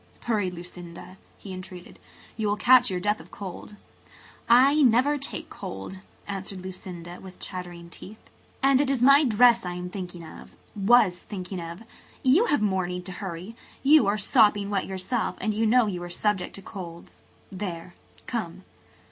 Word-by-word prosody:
"Hurry, 210 Hz, -5 st, 0 dB
Lucinda," 175 Hz, +1 st, -10 dB, 0.2 s
he 195 Hz, -, -9 dB
entreated. 185 Hz, -1 st, -10 dB, 0.4 s
"You 220 Hz, -1 st, -1 dB
will 205 Hz, -, +1 dB
catch 250 Hz, +2 st, +5 dB
your 185 Hz, -, -2 dB
death 210 Hz, +3 st, 0 dB
of -, -, -14 dB
cold." 200 Hz, +1 st, -8 dB, 0.7 s
"I 270 Hz, +6 st, +6 dB
never 265 Hz, +3 st, +4 dB
take 275 Hz, -, -5 dB
cold," 95 Hz, -, -7 dB, 0.3 s
answered 195 Hz, -1 st, -6 dB
Lucinda, 180 Hz, -2 st, -8 dB
with 185 Hz, -1 st, -12 dB
chattering 175 Hz, -2 st, -7 dB
teeth. 210 Hz, +5 st, -11 dB, 0.5 s
"And 270 Hz, 0 st, +5 dB
it 285 Hz, -, 0 dB
is 265 Hz, -3 st, +1 dB
my 275 Hz, +3 st, +7 dB
dress 240 Hz, -1 st, +5 dB
I 180 Hz, -1 st, -4 dB
am 180 Hz, 0 st, -6 dB
thinking 180 Hz, -3 st, -7 dB
of–was 195 Hz, +3 st, +1 dB
thinking 185 Hz, -2 st, -6 dB
of. 170 Hz, +4 st, -8 dB, 0.4 s
You 290 Hz, -, +5 dB
have 290 Hz, -, +1 dB
more 190 Hz, -3 st, +1 dB
need 180 Hz, 0 st, -5 dB
to 185 Hz, -, -7 dB
hurry. 190 Hz, +3 st, -6 dB, 0.3 s
You 285 Hz, -5 st, +6 dB
are 205 Hz, +1 st, +2 dB
sopping 205 Hz, 0 st, +3 dB
wet 195 Hz, -2 st, -1 dB
yourself 195 Hz, +5 st, -2 dB
and 215 Hz, -, -1 dB
you 220 Hz, +1 st, +1 dB
know 245 Hz, +1 st, +5 dB
you 185 Hz, -4 st, -3 dB
are 175 Hz, -, -6 dB
subject 190 Hz, +1 st, -1 dB
to 195 Hz, -, -10 dB
colds. 170 Hz, -4 st, -10 dB, 0.3 s
There–come." 185 Hz, +1 st, -6 dB
195 Hz, 160 wpm, -26 LUFS, 180-230 Hz, 0.7 s, my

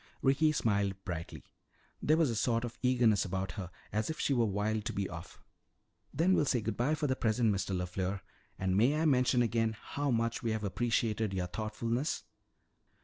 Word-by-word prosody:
Ricky 140 Hz, +3 st, +4 dB
smiled 100 Hz, -8 st, +1 dB
brightly. 85 Hz, -2 st, -5 dB, 0.6 s
There 155 Hz, +2 st, +3 dB
was 160 Hz, -6 st, +3 dB
a -, -, -2 dB
sort 115 Hz, +2 st, +1 dB
of 120 Hz, -, -8 dB
eagerness 125 Hz, -5 st, +3 dB
about 95 Hz, -1 st, -3 dB
her, 90 Hz, 0 st, -6 dB, 0.2 s
as 110 Hz, +6 st, 0 dB
if 160 Hz, -, -4 dB
she 140 Hz, -, +1 dB
were 120 Hz, -3 st, +3 dB
wild 105 Hz, +2 st, -1 dB
to -, -, -2 dB
be 100 Hz, -1 st, -1 dB
off. 85 Hz, -1 st, -9 dB, 0.7 s
"Then 170 Hz, +6 st, +3 dB
we'll 150 Hz, -, +3 dB
say 125 Hz, -, +2 dB
good 110 Hz, -1 st, -3 dB
bye 130 Hz, +8 st, +1 dB
for 150 Hz, -, -2 dB
the 130 Hz, -2 st, +1 dB
present, 115 Hz, -2 st, +2 dB
Mr. 95 Hz, 0 st, -2 dB
LeFleur. 90 Hz, +2 st, -2 dB, 0.4 s
And 95 Hz, -1 st, 0 dB
may 130 Hz, +9 st, +3 dB
I 160 Hz, -, +1 dB
mention 125 Hz, -3 st, +4 dB
again 115 Hz, -1 st, 0 dB
how 145 Hz, 0 st, -3 dB
much 115 Hz, -1 st, 0 dB
we 115 Hz, -, -1 dB
have 110 Hz, -1 st, -3 dB
appreciated 110 Hz, -1 st, 0 dB
your 90 Hz, -1 st, -1 dB
thoughtfulness?" 115 Hz, -, -2 dB
115 Hz, 190 wpm, -32 LUFS, 100-125 Hz, 0.7 s, Ricky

